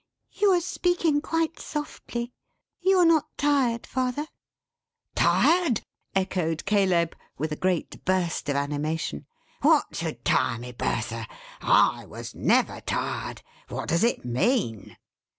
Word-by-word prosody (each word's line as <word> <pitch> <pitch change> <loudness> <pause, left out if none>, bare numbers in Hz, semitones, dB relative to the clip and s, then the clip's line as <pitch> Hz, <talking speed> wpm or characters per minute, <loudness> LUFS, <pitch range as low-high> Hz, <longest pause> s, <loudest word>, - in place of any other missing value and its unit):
"You 415 - +2
are 350 - +3
speaking 345 -3 +1
quite 325 +1 -1
softly. 245 -5 -5 0.5
You 380 +1 +3
are 360 - +6
not 325 -3 +4
tired 270 -5 +2
father?" 260 +3 -1 0.9
"Tired," 335 - +3 0.3
echoed 180 -4 0
Caleb, 185 -5 +2 0.2
with 155 +1 -2
a - - -1
great 180 0 -1
burst 180 -5 0
of 140 - +1
animation, 145 - -2 0.3
"what - - +3
should - - -4
tire 115 - +2
me, 125 +2 -7
Bertha? 115 -1 -2 0.3
I - - +3
was - - -8
never - - +2
tired. - - -3 0.2
What - - -5
does 170 +4 +2
it 235 - +1
mean?" 125 - 0
200 Hz, 125 wpm, -26 LUFS, -, 0.9 s, are